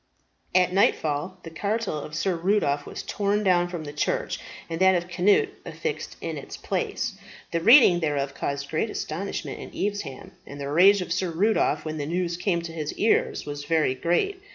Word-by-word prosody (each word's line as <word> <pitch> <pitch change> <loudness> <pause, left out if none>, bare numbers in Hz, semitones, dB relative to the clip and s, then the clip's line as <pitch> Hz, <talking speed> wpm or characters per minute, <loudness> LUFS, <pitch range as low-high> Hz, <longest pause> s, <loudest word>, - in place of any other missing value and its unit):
At 180 0 +4
nightfall 180 -2 +1
the 165 - -8
cartel 200 0 -2
of 150 +1 -7
Sir 185 +3 0
Rudolph 165 -5 +1
was - - -6
torn 205 +1 0
down 175 -2 +3
from 175 -2 -5
the 145 -1 -7
church 150 - -1 0.3
and 165 +1 -4
that 190 0 +6
of 175 0 -1
Cnut 190 +3 +3
affixed 465 -1 -5
in - - -4
its - - -9
place. - - -2 0.4
The 170 - +1
reading 225 - +7
thereof 145 -4 -1
caused 140 0 -4
great 160 +8 0
astonishment 195 +1 -4
in - - -8
Evesham, 205 -9 -3 0.2
and 145 - -9
the 140 0 -4
rage 190 +5 +6
of - - -3
Sir 185 - -1
Rudolph, 165 -3 +1
when 155 0 -4
the 145 - -3
news 170 +1 -1
came 175 -1 0
to 165 -1 -6
his 155 -2 -4
ears, 220 - +1
was 145 0 -6
very 160 -5 +2
great. 175 - 0
175 Hz, 185 wpm, -25 LUFS, 150-195 Hz, 0.4 s, reading